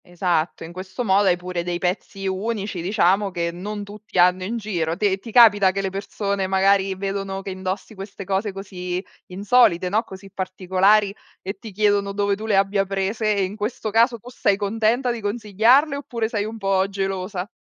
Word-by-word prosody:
esatto, 175 -2 -2
in 165 - -9
questo 185 +6 -5
modo 195 0 +3
hai 175 - +3
pure 180 -1 -4
dei 175 0 -3
pezzi 190 +2 -3
unici, 200 -1 -3
diciamo, 195 +1 +2
che 170 -1 -2
non 205 +4 -5
tutti 205 -1 -8
hanno 180 +1 +4
in 230 +5 -3
giro. 175 -7 -2
Te 195 -2 +1
ti 225 +4 -10
capita 205 -5 +6
che 195 - -2
le 190 - -2
persone, 200 0 -2
magari, 195 0 +2
vedono 195 0 -4
che 195 - -6
indossi 190 +3 -5
queste 195 0 -8
cose 195 +1 -1
così 180 -1 -5 0.2
insolite, 185 -2 +3
no, 215 +4 +1
così 195 0 -11
particolari 190 +2 +2 0.3
e 195 +1 -5
ti 220 0 -10
chiedono 205 0 +1
dove 200 0 0
tu 215 +2 -6
le 210 -3 +2
abbia 195 0 +2
prese? 200 +3 -1
E 200 - +1
in 195 +3 -5
questo 215 +1 -3
caso 230 +3 +3
tu 240 +4 -12
sei 200 -5 +1
contenta 225 +5 0
di 235 -1 -3
consigliarle, 225 +7 +3
oppure 235 -5 -3
sei 205 -3 -1
un 225 +1 -6
po' 195 -2 +1
gelosa? 195 0 -3
195 Hz, 185 wpm, -22 LUFS, 190-210 Hz, 0.3 s, capita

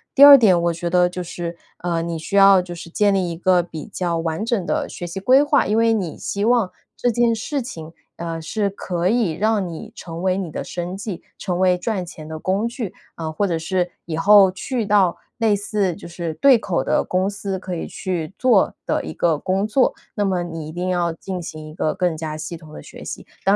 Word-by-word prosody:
第 280 - +8
二 285 -1 +12
点 195 -8 +5
我 170 0 +2
觉 170 +1 -3
得 180 0 +4
就 180 +1 -5
是， 175 -1 -5 0.3
呃， 170 -2 0
你 165 0 -3
需 180 +5 -5
要 195 -1 +8
就 175 -1 -8
是 170 0 -9
建 205 +3 +2
立 185 -3 +1
一 - - -4
个 180 0 +3
比 160 -3 -8
较 175 -2 -2
完 165 +4 -2
整 225 -6 0
的 - - -1
学 175 - -6
习 175 +3 -5
规 260 +8 +5
划， 290 -1 +2
因 210 - +1
为 230 0 +4
你 185 -7 -2
希 200 0 -3
望 230 -4 +3 0.3
这 245 - +1
件 235 0 +2
事 275 +5 -3
情， 165 -9 -8 0.2
呃， 165 -1 -5
是 205 +5 -1
可 180 -2 -2
以 220 -7 +1
让 210 0 0
你 165 - -8
成 170 +1 -7
为 185 -1 +2
你 185 -4 -3
的 - - -5
生 180 +1 -5
计， 200 -3 -5 0.2
成 180 -3 -3
为 185 -1 +4
赚 190 +1 -2
钱 160 -3 -10
的 160 0 -6
工 195 +7 0
具 235 -5 -5 0.2
啊， 160 -1 -5
或 200 +6 0
者 170 -4 -1
是 180 +2 -1
以 160 -1 -4
后 195 +2 +7
去 220 +3 -3
到 195 -4 +3 0.2
类 220 -3 +3
似 200 -3 -1
就 - - -10
是 170 -1 -4
对 270 - +5
口 180 -10 -1
的 150 - +1
公 185 +2 0
司 195 -1 -4
可 185 -1 -5
以 165 - -4
去 180 -3 -4
做 240 -7 +4
的 - - 0
一 80 - -6
个 165 -3 +1
工 190 +5 -1
作。 255 +4 +2 0.2
那 205 - 0
么 185 -2 0
你 165 -3 -6
一 - - -7
定 180 +2 -3
要 175 -2 0
进 185 +2 -6
行 155 -1 -8
一 155 - -11
个 155 - 0
更 175 -3 0
加 155 -1 -4
系 155 +2 -6
统 155 -1 -14
的 - - -9
学 - - -12
习， - - -7 0.2
当 195 +1 +5
185 Hz, 250 characters per minute, -21 LUFS, 170-205 Hz, 0.3 s, 二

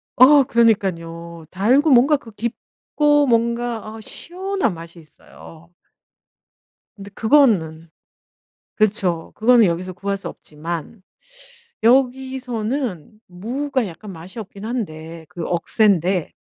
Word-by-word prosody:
어 275 +3 +7
그러니깐요. 170 - 0
달고 255 - +3
뭔가 270 +4 +5
그 235 -4 -14
깊고 290 +6 -1
뭔가 235 -2 -1
어 225 - -10
시원한 370 - -3
맛이 165 +1 -11
있어요. 165 +1 -16 1.2
근데 200 -1 -11
그거는 195 - +2 0.9
그렇죠. 195 -6 +1
그거는 235 0 +5
여기서 180 +1 -2
구할 200 +2 -3
수 195 - -8
없지만 165 +6 -7 0.8
여기서는 250 - 0
무가 250 +8 -3
약간 190 +4 -10
맛이 180 +7 -9
없기는 205 0 -8
한데 165 -8 -6
그 170 - -6
억센데 180 -1 +1
215 Hz, 230 characters per minute, -20 LUFS, 170-250 Hz, 1.2 s, 어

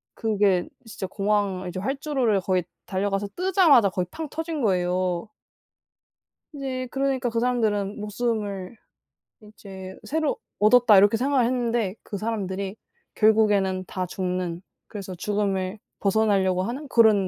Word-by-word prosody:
그게 205 -5 +1 0.2
진짜 205 -3 -6
공항 200 -2 0
이제 180 - -5
활주로를 265 -2 0
거의 185 -1 0 0.2
달려가서 195 +1 -1
뜨자마자 350 - +5
거의 180 -1 -2
팡 320 -1 -5
터진 325 -1 -4
거예요. 180 -2 0 1.2
이제 260 -3 -4
그러니까 270 -2 0
그 230 0 -1
사람들은 215 -4 0
'목숨을 210 -2 -3 0.7
이제 190 -3 -10
새로 315 0 0 0.2
얻었다.' 215 0 +6
이렇게 205 +3 +6
생각을 260 0 +2
했는데 235 -5 0
그 205 - -6
사람들이 200 -2 -3 0.4
결국에는 205 -4 +3
다 185 -1 -3
죽는 180 -2 -3 0.3
그래서 195 -3 -7
죽음을 195 +1 -1 0.2
벗어나려고 195 -3 +2
하는 265 +8 -4
그런 215 -6 +5
210 Hz, 300 characters per minute, -25 LUFS, 190-240 Hz, 1.2 s, 얻었다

